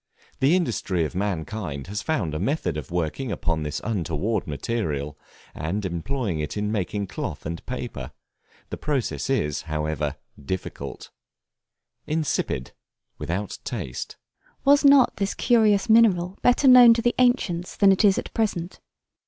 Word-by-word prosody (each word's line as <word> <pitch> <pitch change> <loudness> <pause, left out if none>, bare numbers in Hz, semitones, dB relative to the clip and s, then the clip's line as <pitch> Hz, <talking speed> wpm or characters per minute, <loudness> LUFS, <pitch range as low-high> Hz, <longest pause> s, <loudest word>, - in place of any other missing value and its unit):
The 140 +6 +4
industry 105 - 0
of - - -5
mankind 90 -5 -3
has 100 +3 -4
found 110 - -1
a 75 - -2
method 135 - -1
of 75 -4 -6
working 90 - -2
upon 85 -4 -1
this 75 -1 -3
untoward 100 0 -2
mineral 75 - -3 0.4
and 95 +7 -3
employing 95 - -2
it 75 +6 -4
in 105 0 -1
making 100 0 -2
cloth - - -6
and 85 +1 -5
paper; 120 - -5 0.6
the - - -4
process 125 - -2
is, 75 -1 0
however, 75 -1 -2 0.3
difficult. 95 +6 -6 1.0
Insipid, 150 - -1 0.5
without 95 +4 -4
taste. 80 - -5 0.5
Was 285 +2 +5
not 280 -3 +6
this 195 0 -1
curious 220 -3 +3
mineral 200 -6 +4
better 245 +3 +4
known 245 -2 +9
to 230 - -2
the 240 - +2
ancients 200 -9 +1
than 200 -1 +6
it 195 - +2
is 200 -2 +5
at - - -5
present? 190 -6 -2
105 Hz, 140 wpm, -24 LUFS, -, 1.0 s, known